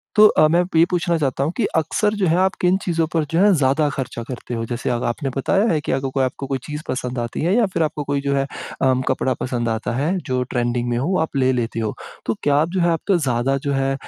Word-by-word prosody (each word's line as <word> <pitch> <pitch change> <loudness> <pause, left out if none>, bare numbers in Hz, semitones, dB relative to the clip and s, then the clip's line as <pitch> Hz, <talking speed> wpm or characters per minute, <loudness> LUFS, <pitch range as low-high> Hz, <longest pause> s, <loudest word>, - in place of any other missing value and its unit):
तो 215 - +8
अ, 155 - +4
मैं 170 +3 +3
अ, 180 - -1
ये 165 - +7
पूछना 175 -1 +1
चाहता 135 -2 0
हूँ 155 - 0
कि - - +2
अक्सर 185 +7 +1
जो 185 - +3
है 165 +2 +3
आप 190 +1 +2
किन 180 +1 +3
चीज़ों 165 -2 +1
पर 160 -2 +2
जो 165 - +2
है 200 0 +5
ज़्यादा 145 +1 +2
ख़र्चा 130 -4 -5
करते 125 -1 -6
हो? 115 0 -2
जैसे, 120 +2 -3
अब 120 0 -1
आपने 135 +4 -2
बताया 195 - +2
है 155 - +2
कि - - -3
अगर 135 0 -1
कोई 135 -1 +1
आपको 130 +1 -3
कोई 135 -1 -1
चीज़ 150 0 -5
पसंद 125 -1 -3
आती 120 -1 -3
है 175 +6 +2
या 235 -2 +4
फ़िर 165 - +1
आपको 150 -1 -2
कोई 140 0 -1
जो 140 0 0
है 135 - +2
अ, 130 -1 -2
कपड़ा 130 0 +1
पसंद 120 -2 -1
आता 110 +1 -2
है 160 +8 0
जो 125 0 +1
ट्रेंडिंग 120 0 0
में 120 - 0
हो 160 +10 0
आप 160 - -3
ले 130 0 +3
लेते 115 -1 -2
हो। 110 -2 -2 0.3
तो 115 - +1
क्या 145 -1 +3
आप 155 +3 +2
जो 185 - +1
है 170 - +3
आप 165 +5 -1
ज़्यादा 135 -6 +1
जो 140 - +1
है 135 0 +1
140 Hz, 275 wpm, -21 LUFS, 125-165 Hz, 0.3 s, तो